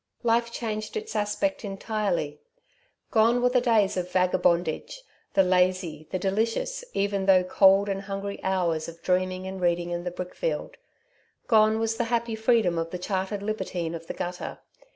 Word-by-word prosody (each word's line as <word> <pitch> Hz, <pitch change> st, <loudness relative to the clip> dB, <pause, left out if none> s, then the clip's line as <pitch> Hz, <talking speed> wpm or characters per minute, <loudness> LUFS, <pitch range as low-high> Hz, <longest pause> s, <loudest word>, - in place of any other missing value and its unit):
Life 235 Hz, 0 st, +2 dB
changed 215 Hz, -, -4 dB
its 440 Hz, 0 st, -6 dB
aspect 210 Hz, +9 st, -1 dB
entirely. 195 Hz, -7 st, -2 dB, 0.7 s
Gone 230 Hz, +2 st, +4 dB
were 250 Hz, 0 st, +3 dB
the 250 Hz, 0 st, +3 dB
days 220 Hz, -5 st, +3 dB
of 180 Hz, 0 st, -2 dB
vagabondage, 180 Hz, -, +1 dB, 0.3 s
the 195 Hz, -, +6 dB
lazy, 180 Hz, -4 st, +1 dB
the -, -, -1 dB
delicious 225 Hz, -, -1 dB
even 200 Hz, -1 st, 0 dB
though 185 Hz, -1 st, +6 dB
cold 195 Hz, +2 st, +5 dB
and 195 Hz, -1 st, -2 dB
hungry 195 Hz, 0 st, -5 dB
hours 175 Hz, -4 st, 0 dB
of 170 Hz, 0 st, -11 dB
dreaming 185 Hz, 0 st, 0 dB
and 190 Hz, 0 st, -6 dB
reading 175 Hz, 0 st, +1 dB
in 175 Hz, 0 st, -3 dB
the 180 Hz, -, -2 dB
brickfield; 180 Hz, -, -4 dB, 0.7 s
gone 220 Hz, -1 st, +4 dB
was 225 Hz, 0 st, -1 dB
the 235 Hz, -, 0 dB
happy 235 Hz, 0 st, -1 dB
freedom 220 Hz, -6 st, +2 dB
of 165 Hz, 0 st, -2 dB
the 180 Hz, -, -4 dB
chartered 190 Hz, +2 st, -2 dB
libertine 190 Hz, -5 st, -3 dB
of 165 Hz, 0 st, -7 dB
the -, -, -5 dB
gutter. 175 Hz, 0 st, -5 dB
195 Hz, 160 wpm, -26 LUFS, 180-220 Hz, 0.7 s, the